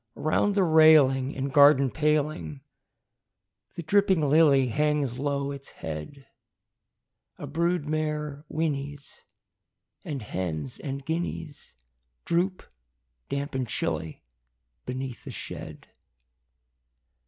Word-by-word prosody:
Around 195 +6 +1
the 200 - +3
railing 155 -5 +5
and 135 0 -3
garden 140 -3 +6
paling 150 - -1 1.1
The 170 - -5
dripping 195 0 +3
lily 140 -3 +5
hangs 145 -1 0
low 140 0 -1
its 140 -1 -8
head: 80 - -8 1.1
A - - -7
brood 170 +2 0
mare 150 -1 -2
whinnies; 145 -2 -4 0.8
and 140 -6 -5
hens 80 -9 -4
and 135 0 -5
guineas 160 - -5 0.5
Droop, 180 +2 0 0.7
damp 140 +1 -3
and 130 -2 -2
chilly, 80 -7 -3 0.6
beneath 130 -1 -5
the - - -8
shed. - - -8
145 Hz, 95 wpm, -27 LUFS, 130-155 Hz, 1.1 s, garden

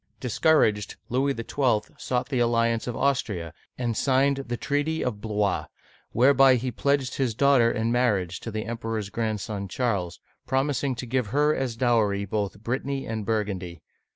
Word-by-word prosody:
Discouraged, 115 - +2
Louis 135 +3 +1
XII. 115 -2 0
sought 125 +1 -2
the 130 -3 0
alliance 115 -1 +1
of 120 - -3
Austria, 100 - -1 0.2
and 120 -2 -1
signed 135 +3 +2
the 120 0 -2
treaty 145 +4 -1
of 105 -5 -3
Blois 105 -3 0
(blwa), - - -24 0.4
whereby 135 +1 +5
he 125 +1 -2
pledged 140 +1 0
his 125 -5 0
daughter 135 -3 +4
in 115 0 -1
marriage 100 -8 +1
to - - -6
the 110 0 -4
Emperor's 115 -3 -4
grandson 105 -3 -3
Charles, 95 - -2 0.3
promising 135 0 0
to 125 - -5
give 125 -1 -1
her 150 +6 +2
as 130 -3 -2
dowry 110 -5 +2
both 105 0 -3
Brittany 135 +3 -2
and 110 -2 -4
Burgundy. 100 -6 -2
115 Hz, 155 wpm, -26 LUFS, 105-130 Hz, 0.4 s, whereby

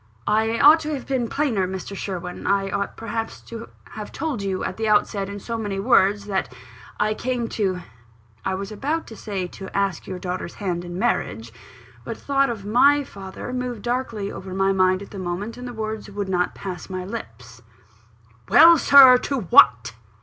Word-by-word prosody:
"I 220 +2 +1
ought 305 +3 +8
to 310 -1 -3
have 265 - -7
been 255 -4 -1
plainer, 235 -11 0
Mr. 190 +1 -6
Sherwin; 180 -2 -5
I 195 -1 +1
ought 200 0 -3
perhaps 225 0 -4
to 230 0 -9 0.2
have 210 -1 -8
told 285 -7 -3
you 195 -1 -2
at - - -4
the 220 0 -1
outset, 205 -1 +1
in 200 0 -6
so 230 +3 -5
many 205 -3 -3
words, 200 -2 +3
that 195 -2 -2 0.5
I 215 +1 +2
came 245 0 -2
to 190 -4 -1 0.3
" 110 -1 -32
(I 190 - -1
was 195 +2 -6
about 290 +10 -2
to 225 - -11
say, 200 -4 -4
"to 190 +1 -9
ask 195 -4 -1
your 185 - -5
daughter's 180 -1 -5
hand 175 -3 -3
in 175 0 -7
marriage;" 115 - -1 0.5
but 175 - -6
a - - -19
thought 275 -1 +1
of 215 -4 -5
my 280 +7 +4
father 195 +1 -8
moved 250 -4 -4
darkly 240 -5 -2
over 185 -1 -8
my 195 0 +2
mind 185 0 +2
at - - -14
that 200 - -7
moment, 185 +5 -4
and 250 0 -8
the - - -6
words 220 -2 -5
would 200 -1 -4
not 180 -1 0
pass 185 -3 -7
my 185 -1 -4
lips). 120 - -9 0.9
"Well, 335 0 +8
Sir! 265 -3 +8
to 275 -1 -2
what?" 120 - +5
200 Hz, 195 wpm, -23 LUFS, 185-235 Hz, 0.9 s, ought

